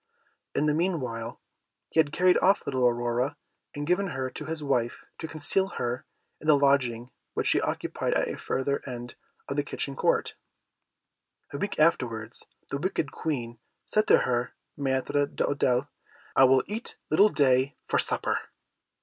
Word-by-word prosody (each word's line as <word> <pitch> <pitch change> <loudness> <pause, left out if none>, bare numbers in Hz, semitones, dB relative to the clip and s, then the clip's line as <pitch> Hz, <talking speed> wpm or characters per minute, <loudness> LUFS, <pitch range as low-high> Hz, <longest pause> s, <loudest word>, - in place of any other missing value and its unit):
In 150 - +2
the 150 - +3
meanwhile, 145 -10 -2 0.5
he - - +1
had 150 -2 +4
carried 180 +2 +4
off 195 +2 +4
little 130 -2 +2
Aurora, 120 +4 0 0.4
and 145 0 -3
given 180 +4 +2
her 130 -6 -3
to 150 - -7
his 155 0 -4
wife, 125 -4 -1
to 160 - -4
conceal 160 +5 +1
her 120 +1 -2 0.3
in 155 - -9
the 150 -2 +7
lodging 130 -4 +2 0.2
which - - 0
she - - +3
occupied - - -1
at - - +2
the - - -3
further 140 +2 -1
end 120 -1 -6 0.3
of 140 - -3
the 145 - +2
kitchen 140 -1 -3
court. - - +1 1.2
A 140 - -4
week 205 - -2
afterwards, 120 -8 +1 0.2
the 140 - -2
wicked 155 -3 -1
Queen 120 -7 -3 0.3
said 215 0 +1
to - - +7
her 120 0 -1 0.2
Maître 140 +1 0
d'Hôtel, 130 -1 +1 0.5
"I 135 - +8
will 130 0 +5
eat 220 +4 -5 0.2
little 200 +7 +6
Day 135 -3 +3
for - - +2
supper." - - +1
140 Hz, 160 wpm, -28 LUFS, 125-155 Hz, 1.2 s, I